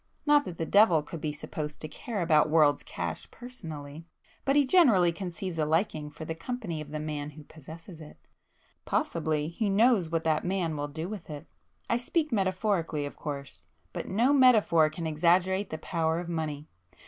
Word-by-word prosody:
Not 295 -1 +5
that 170 - -7
the 165 - -2
devil 180 -5 +5
could 160 +1 -8
be 155 - -1
supposed 150 0 -6
to 155 - -2
care 195 +6 -4
about 155 -2 +4
world's 150 -2 +4
cash 85 -2 -5
personally,—but 165 - -7
he 290 -1 +5
generally 240 - +5
conceives 180 -1 -5
a 155 - +2
liking 155 -2 0
for 155 +2 -9
the 160 - -3
company 170 -2 -5
of 150 - -8
the 155 +1 -5
[p 150 - -5
288] 155 -1 -3
man 145 0 -4
who 155 - -10
possesses 160 +3 -12
it;—possibly 155 0 -4
he 205 +5 -1
knows 205 -3 +3
what 165 0 -1
that 160 -2 +1
man 180 -3 -1
will 145 0 -3
do 160 +3 -5
with 205 -4 -8
it. 150 -1 -7 0.4
I 235 - +2
speak 305 +5 -1
metaphorically 185 -6 0
of 145 - -7
course,—but 140 - -8
no 235 +8 +2
metaphor 215 - +5
can 160 +2 -6
exaggerate 180 +5 +2
the 155 - -4
power 160 0 -1
of 175 - -6
money. 155 -3 -3
165 Hz, 180 wpm, -28 LUFS, 155-195 Hz, 0.4 s, Not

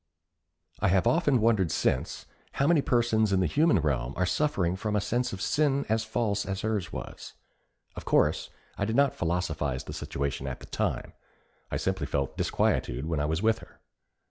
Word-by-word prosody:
I - - +2
have 95 -1 +3
often 150 -6 +3
wondered 105 -6 +3
since, 65 - -1 0.3
how 140 - +1
many 160 -1 +4
persons 115 -5 +2
in 95 - +3
the 95 - +2
human 150 - +3
realm 70 -4 -1
are 90 - +2
suffering 90 - 0
from 105 +2 -2
a - - +3
sense 120 +5 -1
of 95 -1 -5
sin 140 -2 +1
as 110 0 +1
false 110 -2 -1
as 95 0 -4
hers 105 -4 -2
was. - - -8 0.6
Of - - -7
course, - - +2 0.3
I 100 - +1
did 110 +2 -1
not 140 0 +4
philosophize 80 -6 -2
the - - -8
situation 70 -1 -3
at 65 - -5
the - - -11
time. - - -2 0.6
I - - -2
simply - - -1
felt 70 -2 -2
disquietude 60 +4 0
when 80 -2 -1
I 75 - 0
was 80 +5 -1
with 110 0 +3
her. - - -16
100 Hz, 185 wpm, -28 LUFS, 85-120 Hz, 0.6 s, many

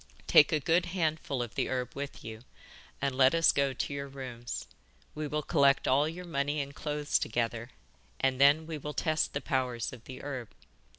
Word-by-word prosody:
'Take 150 - +6
a 155 - +2
good 170 +5 +2
handful 155 -7 -1
of 120 - -8
the - - -1
herb 125 -1 -2
with 140 0 -6
you, 110 0 -8 0.6
and 140 -1 0
let 130 +3 +5
us 165 0 +5
go 140 -1 +1
to 130 +2 -3
your 140 0 -4
rooms. 130 -3 -6 0.5
We 155 0 -4
will 150 +1 -2
collect 140 -3 +3
all 140 +4 +3
your 180 +2 -7
money 145 -2 -1
and 140 0 -4
clothes 150 0 -1
together, 115 +1 -2 0.5
and 130 0 +1
then 145 +3 +6
we 160 -1 -5
will 150 +1 -6
test 155 -2 0
the - - -2
powers 130 -5 -1
of 120 -3 -12
the 130 - -9
herb. 130 -5 -5
140 Hz, 190 wpm, -30 LUFS, 130-150 Hz, 0.6 s, Take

